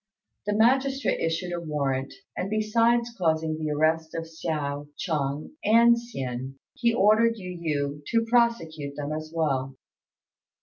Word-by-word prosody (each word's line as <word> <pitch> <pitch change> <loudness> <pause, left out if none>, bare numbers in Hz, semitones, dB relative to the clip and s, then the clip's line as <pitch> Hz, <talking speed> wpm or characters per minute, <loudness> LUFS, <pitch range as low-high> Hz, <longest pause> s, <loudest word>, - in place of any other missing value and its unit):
The 210 - +1
magistrate 265 +5 +2
issued 165 +2 -1
a 175 - -2
warrant; 140 -4 -1 0.2
and, 185 - -3
besides 230 +2 +2
causing 160 -4 0
the 155 -1 -2
arrest 160 +2 +1
of 165 - -2
Hsiao, 150 -3 -3
Chung, 150 -4 -2
and 235 +2 +6
Hsin, 135 - -5 0.2
he 235 -1 +2
ordered 230 +1 +4
Yu 180 -3 -7
yü 145 -3 -2
to 230 -1 +2
prosecute 165 -12 +1
them 145 0 -4
as 155 0 -5
well. 135 -5 -1
165 Hz, 135 wpm, -26 LUFS, 150-230 Hz, 0.2 s, and